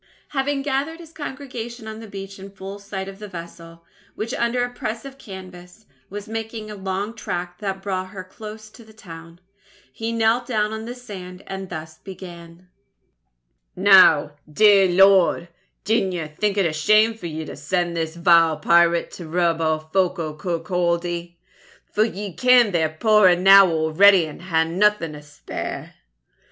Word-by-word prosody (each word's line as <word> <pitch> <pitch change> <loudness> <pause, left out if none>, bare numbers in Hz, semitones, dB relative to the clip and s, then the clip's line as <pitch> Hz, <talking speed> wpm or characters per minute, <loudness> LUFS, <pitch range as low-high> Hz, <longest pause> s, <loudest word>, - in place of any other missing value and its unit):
Having 275 0 -1
gathered 290 +4 -2
his 330 -1 -13
congregation 250 -6 -7
on 220 0 -7
the 225 - -10
beach 195 -1 -9
in 195 +1 -9
full 195 +1 -9
sight 200 -1 -6
of 195 0 -10
the 210 - -8
vessel, 170 -2 -11 0.3
which 225 +4 -4
under 245 -1 0
a 245 - -9
press 230 0 -5
of 270 0 -11
canvas, 185 -1 -12 0.2
was 205 +1 -7
making 220 -1 -6
a - - -7
long 195 +2 -4
tack 175 -4 -5
that 195 -2 -4
brought 185 -2 -3
her 190 -1 -8
close 215 +3 -11
to 235 - -15
the 220 0 -18
town, 170 -5 -12 0.5
he 225 0 -4
knelt 230 +2 +1
down 215 -3 0
on 220 0 -6
the 240 +1 -6
sand 185 -7 -10
and 190 -1 -7
thus 160 -1 -8
began: 175 -2 -11 1.1
"Now, 185 -6 +6 0.2
dear 200 +2 +5
Lord, 185 -1 +4 0.3
dinna 195 -3 0
ye 165 -3 -4
think 200 +7 -2
it 195 - +3
a 160 - 0
shame 215 +9 +3
for 220 -6 -8
ye 160 -1 -5
to - - -8
send 175 -2 -2
this 160 -1 -3
vile 170 -2 +4
pirate 170 +2 +3
to 175 - -9
rob 170 0 0
our 155 -1 -1
folk 190 -1 +2
o' 155 -2 -4
Kirkaldy; 170 0 -2 0.6
for 210 - +3
ye 205 -3 -6
ken 250 -2 +4
they're 160 -3 +1
puir 210 +5 +4
enow 195 +2 +7
already 165 +3 +4
and 155 +1 -10
hae 165 -3 +1
naething 180 -1 +1
to 150 - -10
spare. 145 0 -7
190 Hz, 165 wpm, -22 LUFS, 170-215 Hz, 1.1 s, enow